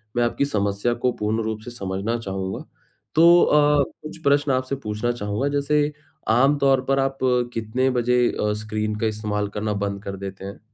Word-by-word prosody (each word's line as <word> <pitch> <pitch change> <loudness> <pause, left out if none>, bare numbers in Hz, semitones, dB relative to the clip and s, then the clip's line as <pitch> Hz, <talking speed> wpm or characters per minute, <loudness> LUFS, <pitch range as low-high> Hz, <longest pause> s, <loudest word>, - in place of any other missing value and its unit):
मैं 120 - +2
आपकी 120 +4 +1
समस्या 100 -1 0
को 125 - +3
पूर्ण 110 +2 0
रूप 110 -1 -3
से 120 - -7
समझना 100 +1 -3
चाहूँगा। 95 -3 -4 0.5
तो 170 +2 +7
अ, 150 -1 +4 0.2
कुछ 155 - -8
प्रश्न 145 0 +3
आपसे 130 +1 0
पूछना 105 +3 -1
चाहूँगा, 105 +3 -2
जैसे 150 +1 +1 0.5
आम 140 +3 +4
तौर 135 -2 +3
पर 135 0 +3
आप 135 0 0 0.4
कितने 115 +4 0
बजे 125 0 +3
अ, 105 0 -1
स्क्रीन 105 0 -2
का 115 - +1
इस्तेमाल 105 -1 -2
करना 105 0 -1
बंद 100 0 -3
कर 100 0 -5
देते 95 0 -7
हैं? 100 - -8
115 Hz, 180 wpm, -23 LUFS, 105-135 Hz, 0.5 s, तो